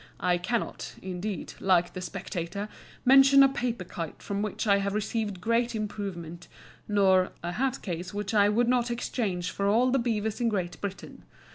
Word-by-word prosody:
I 180 -1 +2
cannot, 225 +6 -3
indeed, 190 0 -4
like 180 -2 +2
the 185 - -5
"Spectator," 190 +2 -5 0.4
"mention 270 +1 +8
a - - +7
paper 240 -6 -2
kite 170 -3 -7
from 200 0 -2
which 210 +1 -2
I 200 -2 +5
have 200 +1 -1
received 215 -2 -2
great 230 +4 +1
improvement," 190 -6 -5 0.4
nor 190 -3 +3
"a 175 - -2
hat 265 +6 -1
case 175 -1 -4
which 205 0 -4
I 205 -1 +5
would 235 +3 +2
not 245 -1 +2
exchange 205 -7 -2
for 200 - -1
all 240 +5 +3
the 270 - +3
beavers 220 -1 -1
in 235 - +3
Great 185 -5 -3
Britain." 200 -1 -6
205 Hz, 170 wpm, -28 LUFS, 185-235 Hz, 0.4 s, mention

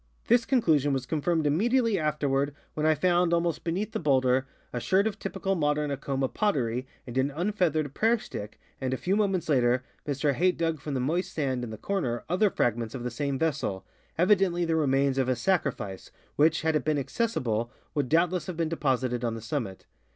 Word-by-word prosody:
This 240 0 +4
conclusion 155 - +3
was 130 -2 -1
confirmed 160 +4 0
immediately 225 - +2
afterward 145 -2 0 0.2
when 155 0 0
I 155 - +4
found, 175 +1 +3
almost 170 -2 -1
beneath 190 +6 -2
the - - -2
bowlder, 130 -3 +2 0.3
a 120 - -1
sherd 190 - +2
of 220 -1 -2
typical 195 0 -2
modern 150 -3 0
Acoma 135 -1 -1
potter}^ 130 - -1 0.2
and 120 - -8
an 135 +2 +2
unfeathered 160 -3 0
prayer 225 +7 +3
stick, 110 - -8 0.2
and 130 0 0
a - - -5
few 180 +11 0
moments 195 -5 +1
later 125 -3 +3 0.2
Mr 140 0 +1
Hayt 180 +6 +2
dug 165 -2 0
from 145 0 -4
the - - 0
moist 165 +9 -1
sand 130 -5 -1
in 120 - -4
the 110 - -7
corner 130 - -2
other 185 +4 +3
fragments 115 - -1
of 125 - -5
the 125 - -3
same 140 +2 -2
vessel, 140 -11 -1 0.3
evidentl}^ 180 -1 +3
the 165 -1 +1
remains 135 -3 +2
of 130 -1 +1
a 130 - +2
sacrifice, 125 - -1 0.3
which, 160 +2 +3
had 160 -1 +2
it 150 - +1
been 155 -1 +1
accessible, 130 - -1 0.2
would 145 -5 -1
doubtless 175 +3 +2
have 180 -3 -5
been 165 -2 0
deposited 130 -6 0
on 115 -1 -1
the - - -5
summit. 115 -5 -4
150 Hz, 195 wpm, -28 LUFS, 130-175 Hz, 0.3 s, This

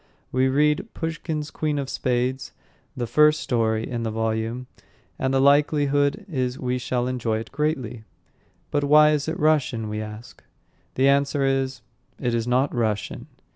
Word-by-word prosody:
We 130 +1 +2
read 150 +9 +1
Pushkin's 160 -2 -4
Queen 150 -1 -1
of 140 -1 -2
Spades, 130 0 -1 0.4
the 120 - -1
first 150 +5 +4
story 110 -2 0
in 120 -2 -3
the 115 - -2
volume, 110 +2 -2 0.5
and 130 - 0
the 135 - +2
likelihood 145 +4 +3
is 130 -6 -2
we 125 0 -2
shall 125 0 -1
enjoy 120 -3 -1
it 110 - -7
greatly. 135 -6 -2 0.7
"But 145 - +1
why 150 +1 +6
is 150 -1 0
it 160 +2 -3
Russian?" 140 -7 +1
we 105 0 -3
ask. 110 +2 -10 0.5
The 135 +1 +3
answer 140 0 +2
is, 135 -1 0 0.4
"It 125 -3 -1
is 115 0 -1
not 130 +3 +1
Russian." 110 -4 -2
130 Hz, 155 wpm, -24 LUFS, 120-145 Hz, 0.7 s, why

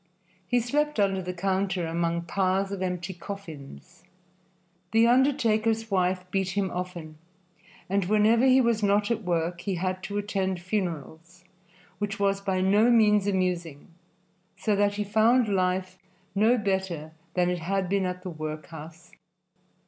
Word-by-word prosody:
He 245 - +2
slept 295 +3 0
under 195 -1 +2
the 180 0 -4
counter 190 0 -1
among 170 +1 -1
piles 190 +3 0
of 195 -2 -4
empty 180 0 -3
coffins. 170 - -10 0.9
The 225 +1 +5
undertaker's 230 -4 +2
wife 185 -1 +1
beat 190 0 -1
him 195 -3 0
often, 175 -4 -6 0.7
and 195 0 0
whenever 215 +4 +3
he 260 0 +6
was 235 -3 +1
not 205 +2 +2
at 230 -1 0
work 175 -2 -1
he 195 -1 -2
had 185 +1 -2
to 205 - -4
attend 195 -3 -1
funerals, 175 -2 -4 0.6
which 200 -1 -3
was 200 0 +1
by 190 -2 -1
no 205 +5 +4
means 210 -4 +4
amusing, 180 -5 -2 0.7
so 210 - 0
that 205 0 +2
he 210 - -1
found 220 +4 +3
life 185 -1 -1 0.3
no 220 +5 +3
better 190 -7 -2 0.2
than 180 -1 +2
it 180 - -2
had 190 +3 -1
been 195 0 +1
at 180 0 -5
the 185 - -5
workhouse. 155 +2 -8
190 Hz, 145 wpm, -27 LUFS, 180-210 Hz, 0.9 s, he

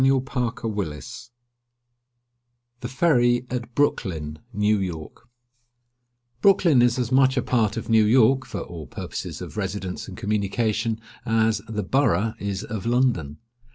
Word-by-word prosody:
VIEW 135 0 +3
OF 115 - -4 1.5
THE 125 - -5
FERRY 125 -4 +2
AT 120 -1 -4
BROOKLYN, 80 - -1
NEW 105 -1 +2
YORK 90 +5 -6 1.1
Brooklyn 175 -9 +5
is 120 0 +3
as 125 -1 -2
much 130 0 +4
a 125 - +2
part 110 -4 +1
of 115 - -4
New 110 -1 +4
York, 130 +4 +4
for 105 -4 -5
all 80 -3 -8
purposes - - -6
of - - -9
residence 95 -2 -4
and 95 - -9
communication, 105 +2 -1 0.2
as 115 -1 +1
"the 105 -2 -2
Borough" 110 -2 +1
is 100 -1 -3
of 110 0 -5
London. 120 - +1
115 Hz, 130 wpm, -24 LUFS, 100-125 Hz, 1.5 s, Brooklyn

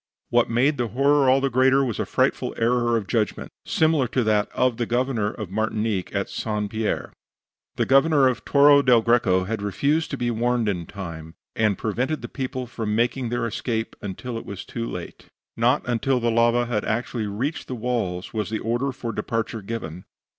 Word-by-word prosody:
What 120 0 +3
made 130 +5 +2
the 120 - +1
horror 140 +4 +3
all 130 +1 +5
the 135 0 0
greater 130 +2 +4
was 120 -4 -3
a - - -1
frightful - - 0
error 120 0 +2
of 110 - -3
judgment, 110 0 -1 0.2
similar 155 -5 +2
to 125 +1 0
that 105 -1 +1
of 125 -2 +1
the 120 -2 -1
Governor 120 -3 0
of 105 -4 -7
Martinique 110 -2 -1
at - - 0
St. 105 -2 -3
Pierre. 110 -1 -2 0.6
The - - +1
Governor 135 0 +5
of 125 -2 -1
Torre 145 0 +6
del 125 -4 +5
Greco 110 -6 +3
had 105 +2 -3
refused 140 +10 0
to 140 - -4
be 120 -1 -1
warned 120 0 0
in 90 -5 -2
time, 85 -4 -8 0.2
and 110 -3 +2
prevented 125 +8 -2
the - - -4
people 130 -2 -4
from 110 -3 -3
making 120 +2 0
their 120 0 -1
escape 115 0 -3
until 115 +4 -5
it - - -11
was 100 -2 -7
too 115 -1 -4
late. 90 -1 -8 0.3
Not - - +2
until 125 +2 +1
the 120 -1 +1
lava 120 +1 +3
had 115 -3 -1
actually 115 0 -2
reached 130 +10 -3
the 130 - -4
walls 110 -7 -2
was 110 -1 -2
the 110 - -1
order 120 +5 -1
for 120 -2 -5
departure 115 -1 -3
given. 95 -5 -6
115 Hz, 190 wpm, -24 LUFS, 110-130 Hz, 0.6 s, Torre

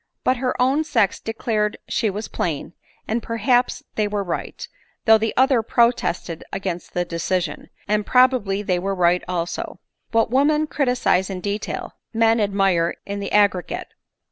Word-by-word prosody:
But 255 - +2
her 255 0 -2
own 265 +5 +3
sex 225 -10 +1
declared 220 -2 -1
she 225 - 0
was 210 +3 -4
plain 165 0 -3 0.2
— - - -35
and 230 +2 -1
perhaps 245 +3 +1
they 215 -1 0
were 205 -1 -2
right— 175 - -5 0.4
though 220 -1 +7
die 225 0 0
other 260 -2 +4
protested 235 -8 +1
against 180 -3 -4
the 175 0 +1
decision 170 -1 -2
— - - -34
and 210 0 +1
probably 245 -5 +3
they 180 -3 0
were 195 +2 -2
right 180 0 +3
also; 175 -1 -3 0.3
but 225 -1 +2
women 300 +4 +3
criticise 250 -10 +1
in 190 -2 -4
detail, 205 +3 -4 0.2
men 225 0 +4
admire 195 -5 +2
in 200 0 -4
the 200 - -4
aggregate. 200 -4 +1
210 Hz, 160 wpm, -22 LUFS, 185-240 Hz, 0.4 s, though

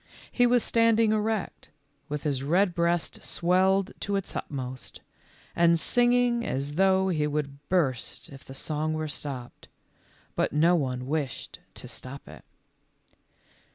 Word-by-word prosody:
He 245 -1 +4
was 245 -1 +3
standing 230 -1 +3
erect, 215 -2 -2 0.4
with 150 0 -3
his 140 -3 -1
red 175 +6 +2
breast 170 0 0
swelled 190 +2 +2
to 200 - -2
its 195 - -3
utmost, 130 -2 -6 0.5
and 170 0 +5
sinaino' 245 +5 +3
as 140 - -2
though 190 +2 +3
he 155 -4 +1
would 145 -2 -3
burst 140 -10 0
if 135 -1 -12
the 135 - -11
sons* 155 +2 -2
were 155 0 -2
stopped; 135 -4 -6 0.7
but - - 0
no 165 +4 +4
one 130 -5 -1
wished 145 -2 -3 0.2
to - - -8
stop 135 +2 -8
it. - - -12
165 Hz, 135 wpm, -27 LUFS, 140-195 Hz, 0.7 s, and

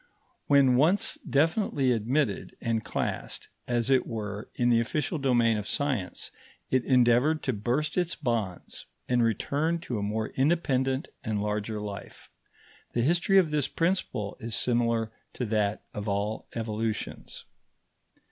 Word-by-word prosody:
When 135 -3 +5
once 170 +9 +4
definitely 145 - +2
admitted 120 +1 0
and 115 -2 -1
classed, - - -3 0.2
as 120 +1 +1
it 130 - +3
were, 105 -2 -5
in 120 0 +2
the 115 -1 +5
official 145 +7 -1
domain 120 -5 +3
of 105 - -6
science, 135 -11 -2 0.4
it 130 -1 +3
endeavoured 125 +4 +4
to 130 - 0
burst 125 - 0
its 175 +1 0
bonds 110 -7 -3 0.2
and 125 -1 +2
return 145 - +1
to 120 -9 -3
a - - -3
more 110 +2 -2
independent 135 -3 +1
and 110 -3 -1
larger 105 +1 -2
life. 105 -1 -8 0.6
The 120 - +1
history 175 - +3
of 175 -5 +4
this 145 -3 +1
principle 135 - -1
is 115 -1 -3
similar 115 -2 +1 0.2
to 125 - -3
that 105 -2 0
of 105 -1 -5
all 105 +2 -2
evolutions. 110 -1 -4
120 Hz, 140 wpm, -28 LUFS, 110-140 Hz, 0.6 s, When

